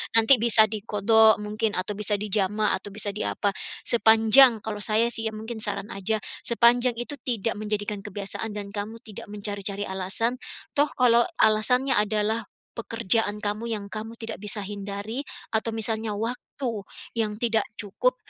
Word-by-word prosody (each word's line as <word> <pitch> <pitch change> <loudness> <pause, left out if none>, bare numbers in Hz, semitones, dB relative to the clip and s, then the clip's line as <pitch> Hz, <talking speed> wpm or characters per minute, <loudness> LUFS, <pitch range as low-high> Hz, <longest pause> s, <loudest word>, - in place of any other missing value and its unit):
nanti 225 +4 +7
bisa 230 -2 +7
diqodho 220 +1 +3
mungkin 215 +1 -2
atau 190 +3 -2
bisa 210 0 +1
dijamah 210 0 0
atau 205 - -10
bisa 205 -1 0
di - - -3
apa, 200 -1 -1 0.3
sepanjang 225 +1 +6
kalau 210 -1 -5
saya 225 +3 +2
sih 225 -1 +1
ya 220 - -4
mungkin 220 +1 -7
saran 205 +1 -4
aja, 195 +3 0 0.3
sepanjang 240 +1 +4
itu 265 +4 -4
tidak 230 -3 -2
menjadikan 210 -1 -3
kebiasaan 205 +2 -5
dan 200 -1 -5
kamu 215 +2 -6
tidak 210 -2 -10
mencari-cari 205 -1 -3
alasan, 195 +7 0 0.4
toh 290 +1 +3
kalau 240 -2 +4 0.2
alasannya 250 +5 +3
adalah 215 +1 0 0.3
pekerjaan 225 -2 +1
kamu 215 +3 -3
yang 200 -1 -6
kamu 225 +1 -7
tidak 225 -2 -7
bisa 210 0 0
hindari 205 +4 -6 0.3
atau 225 +1 -1
misalnya 220 -1 -1
waktu 230 0 -5 0.3
yang 210 -2 0
tidak 225 -1 +1
cukup 225 - -1
215 Hz, 150 wpm, -25 LUFS, 205-230 Hz, 0.4 s, nanti